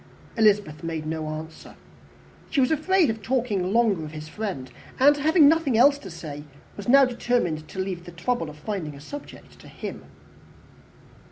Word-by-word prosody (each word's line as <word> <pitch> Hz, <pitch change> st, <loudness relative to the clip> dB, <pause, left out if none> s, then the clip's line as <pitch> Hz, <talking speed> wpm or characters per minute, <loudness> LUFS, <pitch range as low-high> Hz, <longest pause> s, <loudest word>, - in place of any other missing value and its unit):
Elizabeth 205 Hz, -, +2 dB
made 165 Hz, -2 st, -4 dB
no 155 Hz, 0 st, -3 dB
answer. 155 Hz, +1 st, -8 dB, 0.7 s
She 285 Hz, -, 0 dB
was 255 Hz, +2 st, +3 dB
afraid 320 Hz, -1 st, +3 dB
of 220 Hz, 0 st, -7 dB
talking 215 Hz, -6 st, -1 dB
longer 215 Hz, -7 st, +2 dB
of 155 Hz, 0 st, -8 dB
his 155 Hz, 0 st, -7 dB
friend; 180 Hz, -9 st, -5 dB, 0.3 s
and, 290 Hz, +2 st, +6 dB
having 310 Hz, +1 st, +5 dB
nothing 305 Hz, -6 st, +3 dB
else 280 Hz, +4 st, +5 dB
to 195 Hz, -, -9 dB
say, 150 Hz, -4 st, -8 dB, 0.3 s
was 205 Hz, +2 st, -6 dB
now 275 Hz, +1 st, +7 dB
determined 235 Hz, -11 st, -1 dB
to -, -, -12 dB
leave 185 Hz, -2 st, -3 dB
the 175 Hz, -, -9 dB
trouble 175 Hz, +1 st, -2 dB
of 150 Hz, -, -11 dB
finding 155 Hz, -3 st, -5 dB
a -, -, -11 dB
subject 285 Hz, -, -11 dB
to -, -, -14 dB
him. -, -, -8 dB
205 Hz, 170 wpm, -25 LUFS, 160-255 Hz, 0.7 s, now